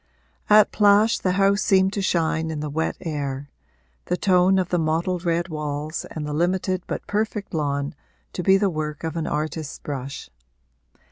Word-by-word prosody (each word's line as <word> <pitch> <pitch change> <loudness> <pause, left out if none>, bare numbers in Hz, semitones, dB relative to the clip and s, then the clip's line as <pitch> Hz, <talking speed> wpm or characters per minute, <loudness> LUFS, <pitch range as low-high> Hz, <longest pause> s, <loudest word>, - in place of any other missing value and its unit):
At 210 0 +6
Plash 210 +1 +4
the 185 - 0
house 200 +1 +3
seemed 190 0 +3
to 200 - -1
shine 160 -3 0
in 155 -2 -4
the 150 -1 -4
wet 160 +2 -1
air 145 -3 -4 0.5
the 180 - -1
tone 185 0 +4
of 185 -2 0
the 175 - +1
mottled 165 +3 -1
red 170 +1 0
walls 150 0 -4
and 155 -2 -5
the 150 - -4
limited 185 +3 0
but - - -4
perfect 210 -1 -2
lawn 140 -2 -1 0.4
to - - -3
be 190 +2 +5
the 195 -1 +1
work 155 -1 -4
of 160 0 -3
an 165 -1 -2
artist's 155 0 -3
brush. 140 - -6
165 Hz, 175 wpm, -23 LUFS, 150-190 Hz, 0.5 s, At